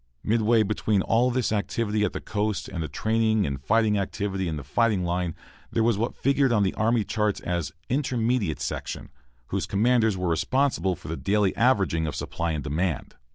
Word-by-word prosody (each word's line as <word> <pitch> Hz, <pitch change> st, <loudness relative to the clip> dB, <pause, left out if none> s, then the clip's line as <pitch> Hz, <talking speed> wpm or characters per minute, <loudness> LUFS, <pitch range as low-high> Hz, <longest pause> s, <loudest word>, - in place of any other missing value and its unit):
Midway 110 Hz, +1 st, +3 dB
between 105 Hz, -1 st, 0 dB
all 120 Hz, +3 st, +3 dB
this 125 Hz, -2 st, 0 dB
activity 105 Hz, 0 st, 0 dB
at -, -, +1 dB
the -, -, -5 dB
coast 105 Hz, 0 st, -2 dB
and 85 Hz, -, -5 dB
the 80 Hz, -, -2 dB
training 110 Hz, +6 st, +1 dB
and 70 Hz, -1 st, -4 dB
fighting 110 Hz, +2 st, +3 dB
activity 100 Hz, -2 st, -2 dB
at 80 Hz, -, -3 dB
the 70 Hz, -, -6 dB
fighting 105 Hz, -, +1 dB
line 85 Hz, -1 st, -1 dB, 0.4 s
there 115 Hz, -, +1 dB
was 115 Hz, -1 st, +3 dB
what 115 Hz, +4 st, -2 dB
figured 135 Hz, -1 st, +2 dB
on 105 Hz, -3 st, +3 dB
the 95 Hz, -, 0 dB
army 115 Hz, 0 st, +2 dB
charts 105 Hz, -1 st, 0 dB
as 85 Hz, -4 st, -2 dB, 0.2 s
"Intermediate 125 Hz, -, 0 dB
Section," -, -, -4 dB, 0.4 s
whose -, -, -2 dB
commanders 110 Hz, 0 st, +2 dB
were 90 Hz, -1 st, -1 dB
responsible 95 Hz, -, +1 dB
for -, -, -12 dB
the 80 Hz, -, -3 dB
daily 100 Hz, -1 st, +1 dB
averaging 95 Hz, -10 st, +2 dB
of 75 Hz, -, -4 dB
supply 85 Hz, -1 st, -3 dB
and 75 Hz, -2 st, -3 dB
demand. 80 Hz, +3 st, -2 dB
105 Hz, 185 wpm, -26 LUFS, 90-115 Hz, 0.4 s, Midway